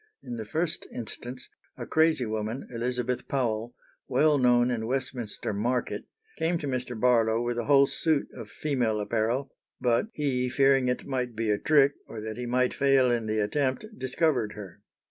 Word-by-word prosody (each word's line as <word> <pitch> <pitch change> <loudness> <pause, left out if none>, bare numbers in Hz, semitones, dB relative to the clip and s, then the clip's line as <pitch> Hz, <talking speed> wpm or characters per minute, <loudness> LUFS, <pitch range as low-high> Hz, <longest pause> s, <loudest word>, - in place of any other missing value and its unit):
In 120 - -6
the 110 - -5
first 165 +8 -2
instance 125 +2 -7 0.3
a - - -5
crazy 160 -5 +2
woman, 110 +3 -3
Elizabeth 125 +1 -2
Powell, 120 -3 -1 0.3
well 145 +3 +3
known 125 -1 +4
in 110 -2 -2
Westminster 125 -5 -2
Market, 120 +5 -1 0.3
came 170 +2 +1
to 155 - -6
Mr. 125 -3 -3
Barlow 115 -2 +3
with 120 0 -1
a 115 - -2
whole 140 -1 +6
suit 155 +1 +1
of 115 -4 -9
female 125 -8 -1
apparel, 115 +6 -1 0.3
but 125 - +2
"he, 130 -4 0
fearing 135 0 +3
it 125 - -1
might 125 -3 -2
be 110 -1 0
a 105 - +1
trick, 145 -2 +4
or 110 - -7
that 110 +1 -6
he 125 0 -4
might 125 +1 +1
fail 135 -2 +3
in 115 -2 -1
the 110 0 -1
attempt, 130 - 0
discovered 130 - 0
her." 100 -1 -10
125 Hz, 170 wpm, -27 LUFS, 115-135 Hz, 0.3 s, whole